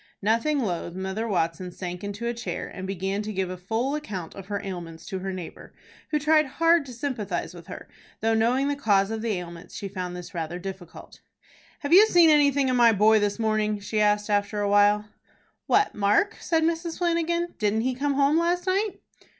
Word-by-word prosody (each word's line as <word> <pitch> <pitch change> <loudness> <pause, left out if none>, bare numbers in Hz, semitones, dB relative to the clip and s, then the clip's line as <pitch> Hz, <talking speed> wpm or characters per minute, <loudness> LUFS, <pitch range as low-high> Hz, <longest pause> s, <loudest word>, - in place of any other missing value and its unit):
Nothing 230 +8 +2
loth, 175 -5 -3
Mother 190 +4 -3
Watson 180 -2 -1
sank 180 +1 -6
into 205 +3 -5
a 235 - 0
chair, 235 - -5
and 190 0 -7
began 195 +1 -2
to 215 0 -5
give 190 -2 -2
a - - -4
full 225 +9 -2
account 205 - -5
of 195 -1 -10
her 200 -1 -2
ailments 175 -4 -7
to 190 -2 -4
her 190 +1 -4
neighbor, 185 -3 -9 0.3
who 300 - +1
tried 305 0 +3
hard 330 +2 +2
to - - -8
sympathize 225 -9 -3
with 170 -2 -12
her, - - -9 0.3
though, 225 +1 +1
knowing 240 +5 +2
the 285 - 0
cause 205 -6 +2
of 225 0 -3
the 225 -1 -1
ailments, 170 -2 -7
she 200 - -5
found 180 -2 -5
this 180 -1 -9
rather 170 0 -4
difficult. 185 -2 -9 0.6
"Have 285 +2 0
you 410 +4 +9
seen 345 -5 +6
anything 285 -2 +4
of 255 - +1
my 235 -1 +6
boy 215 +1 +4
this 205 -1 0
morning?" 215 -2 0
she 210 +1 -2
asked 210 0 +2
after 205 0 0
a 205 - 0
while. 205 +1 +4 0.6
"What, 415 +1 +3
Mark?" 210 - +2
said 325 -1 +1
Mrs. 330 0 -1
Flanagan. 340 0 0
"Didn't 215 +1 +1
he 255 +2 0
come 280 +2 -1
home 285 +3 +3
last 350 +1 0
night?" 390 +1 -1
215 Hz, 200 wpm, -25 LUFS, 190-285 Hz, 0.6 s, you